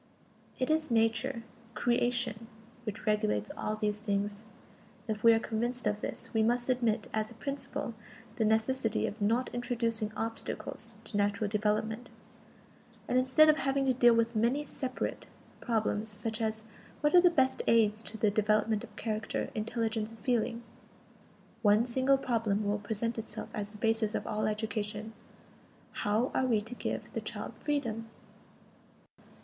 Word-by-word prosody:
It 255 +3 0
is 310 -1 +1
Nature, 230 +2 +1 0.3
"creation," 240 -2 0 0.4
which 215 0 -5
regulates 105 - +1
all 215 - -2
these 210 -1 -1
things. 205 0 -2 0.6
If 215 -1 -3
we 230 - +9
are 225 - +5
convinced 240 +3 -2
of 210 0 0
this, - - -3
we 220 - +3
must 240 +3 +1
admit 240 -4 +1
as 215 0 0
a 235 - -12
principle 275 -2 -4 0.4
the 225 - +2
necessity 220 +2 +1
of 215 - -5
"not 230 +5 +1
introducing 230 -3 -1
obstacles 225 0 -3
to 215 -1 -2
natural 205 +1 +1
development"; 215 +2 0 1.0
and - - 0
instead 260 +5 +6
of 305 0 +6
having 275 -1 +1
to 260 - +3
deal 240 -1 +6
with 230 0 +1
many 240 +7 +2
separate 260 -2 -4 0.3
problems 220 -2 0
such 215 +1 -4
as, 220 0 -1 0.4
what 295 0 +2
are 355 - +9
the 355 - +7
best 265 -6 +2
aids 220 -2 +4
to 220 - -5
the 215 -1 +3
development 215 +1 +2
of 210 - -11
character, 215 -1 -2
intelligence 225 0 -1
and 225 - -15
feeling? 235 -2 0 1.0
one 210 +1 +5
single 260 +2 +3
problem 225 -5 0
will 205 +1 0
present 220 +3 -2
itself 225 - -6
as 205 -1 -3
the 210 - -11
basis 225 0 +1
of - - -2
all 215 0 -1
education: 215 0 -3 0.8
How 215 +5 0
are 260 - +2
we 225 -4 +3
to 225 +4 -7
give - - -4
the - - -2
child - - -5
freedom? 230 -7 -2
225 Hz, 155 wpm, -31 LUFS, 215-245 Hz, 1.0 s, we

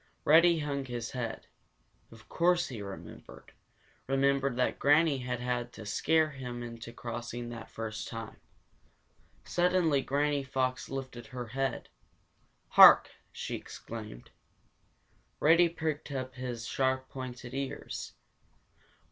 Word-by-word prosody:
Reddy 170 +2 +6
hung 140 -3 -2
his 120 -3 -5
head. 115 -3 -4 0.7
Of 110 -1 -15
course 175 +1 +2
he 115 -5 -6
remembered 100 -1 -10 0.6
remembered 135 -1 +2
that 125 0 0
Granny 145 0 +4
had 125 -1 -3
had 120 -1 -2
to 110 - -9
scare 155 +8 +2
him 125 -3 -6
into 115 0 -8
crossing 120 0 -6
that 115 -1 -8
first 110 -1 -5
time. 115 -1 -7 1.1
Suddenly 175 -5 +2
Granny 145 +1 0
Fox 130 -1 -2
lifted 130 -4 -6
her 125 +1 -6
head. 135 +3 -2 0.8
"Hark!" - - +9 0.2
she - - -5
exclaimed. 110 - -8 1.1
Reddy 170 +3 +5
pricked 155 -3 -3
up 130 -2 -4
his 125 -3 -5
sharp, 130 +1 0
pointed 125 -1 -7
ears. 135 0 -5
130 Hz, 115 wpm, -31 LUFS, 120-145 Hz, 1.1 s, Hark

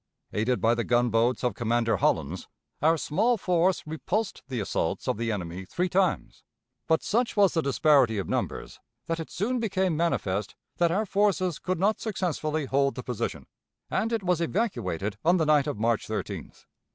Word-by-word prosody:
Aided 120 +4 +1
by 115 +1 +4
the 120 0 -1
gunboats 120 0 +2
of 125 - +1
Commander 115 -2 +1
Hollins, 85 +1 0 0.3
our 160 +3 +4
small 225 +11 +1
force 180 -1 +1
repulsed 195 +7 -2
the 130 -3 -3
assaults 100 - -2
of - - +1
the 115 0 -1
enemy 90 -2 -4
three 180 - -2
times, 185 0 0 0.5
but 160 - +2
such 235 +1 0
was 200 -2 +5
the 165 - +2
disparity 140 -5 +3
of 100 - -2
numbers - - -3 0.3
that 165 0 -2
it 160 - -6
soon 240 +6 -1
became 190 -6 0
manifest 105 - -1 0.2
that 170 -1 +3
our 200 +6 0
forces 195 -4 +1
could 185 0 -2
not 210 +4 +2
successfully 155 -7 -2
hold 140 +1 +1
the 125 - -6
position, 125 -4 -4 0.5
and 225 - 0
it 225 -3 -1
was 180 -2 +1
evacuated 105 - -2
on 175 +3 +4
the 160 - +1
night 150 -2 +4
of 145 - -2
March 115 +1 0
13th. 100 -6 -6
155 Hz, 175 wpm, -27 LUFS, 115-185 Hz, 0.5 s, was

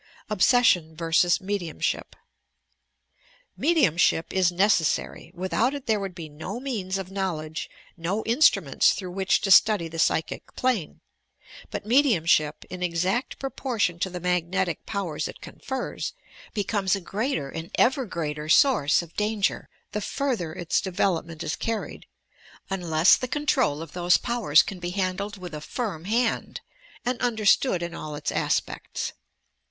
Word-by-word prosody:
OBSESSION 185 -6 +3
VERSUS 165 +2 +2
MEDIUMSHIP 190 -4 -3 1.4
Mediumahip 180 - +2
is 185 -2 +3
necessary! 180 -3 +1
Without 220 +9 0
it 280 - -7
there 220 -2 +1
would 195 -3 -5
be 165 -3 -7
no 160 +9 -6
meaus 210 -8 -3
of 190 -1 -6
knowledge, 165 -5 -3 0.3
no 180 +6 -2
instruments 225 - +4
through 185 -3 -6
which 190 +1 +1
to 195 - 0
study 205 -3 +6
the 165 0 -7
psychic 160 - 0
plane; 250 -11 -1 0.7
but - - -5
mediumahip, 210 - +3
in 180 - -6
exact 180 +7 -1
proportion 240 -10 -2
to 190 - -1
the 180 0 -6
magnetic 180 0 -1
powers 175 -8 -2
it - - -10
confers, 265 0 -5 0.4
becomes 200 -2 +1
a 195 - -5
greater 195 - -2
and 165 +1 -6
ever 260 +2 +3
greater 155 -3 -4
source 190 - +4
of 170 0 -14
danger, 210 -1 -1 0.2
the 210 - -3
further 240 - -2
its 175 0 -1
development 175 -4 -1
is 155 - -2
carried, 225 -2 -4 0.6
unless 170 -3 +4
the 255 - -4
control 255 - +1
of 165 - -11
those 175 0 +3
powers 235 -11 +3
can 195 - -7
be 175 0 -4
handled 195 +2 -2
with 180 -3 -8
a 150 - -5
firm 185 -3 -4
hand 230 +3 0 0.4
and 245 0 -1
understood 220 -4 +2
in 170 0 -5
all 155 -2 -6
its - - -3
aspects. - - -2
185 Hz, 140 wpm, -25 LUFS, 165-220 Hz, 1.4 s, study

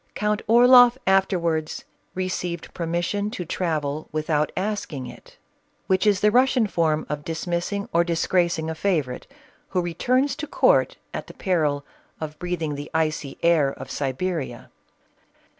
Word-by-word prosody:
Count 210 0 0
Orloff 245 +2 +7
afterwards 170 -5 +1 0.3
received 180 -2 -3
permission 175 +4 -1
to 185 -6 -5
travel, 155 -4 -2
without 155 0 0
asking 185 -9 -3
it, 125 - -13 0.5
which 190 +2 +2
is 200 -3 +3
the 210 - +4
Russian 255 0 +4
fbrrn 160 -5 0
of 150 0 -4
dismiss 170 +3 -3
ing 200 0 -3
or 170 +1 +4
disgracing 170 -1 0
a 160 - -2
favorite, 160 -8 -1 0.4
who 180 - 0
returns 255 - +1
to 305 - -5
court - - +3 0.2
at - - -5
the - - -12
peril 150 -6 0 0.3
of 155 -1 -6
breathing 175 -4 -2
the 145 +1 -6
icy 155 -3 -1
air 165 -5 +4
of 135 -1 -9
Siberia. 140 -2 -3
170 Hz, 140 wpm, -24 LUFS, 155-200 Hz, 0.5 s, Orloff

